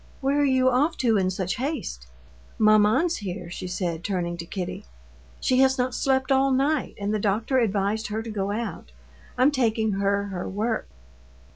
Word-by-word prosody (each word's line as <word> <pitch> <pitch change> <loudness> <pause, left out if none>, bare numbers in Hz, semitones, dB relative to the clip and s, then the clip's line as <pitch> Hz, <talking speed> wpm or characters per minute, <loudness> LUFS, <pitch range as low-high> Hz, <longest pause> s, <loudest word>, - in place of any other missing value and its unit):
"Where 280 +1 +1
are - - +3
you 260 -2 +3
off 275 +6 +2
to 235 -3 +2
in 185 -1 +1
such 185 0 -2
haste?" 245 - -4 0.5
"Maman's 215 +10 +4
here," 180 -3 -6
she 180 - -5
said, 175 -2 -3
turning 175 -3 -2
to 170 0 -7
Kitty. 180 - -5 0.5
"She 255 0 +2
has 265 0 +4
not 250 0 0
slept 265 0 +1
all 270 0 +4
night, 270 +2 +1
and 200 +1 -1
the 215 - 0
doctor 220 +6 +1
advised 210 -1 0
her 220 +1 -3
to 225 - -6
go 200 -2 -2
out. 225 +3 -5 0.4
I'm 255 +4 +5
taking 225 -5 +1
her 200 +1 +1
her 180 -2 -4
work." 220 +3 -2
220 Hz, 175 wpm, -25 LUFS, 195-260 Hz, 0.5 s, I'm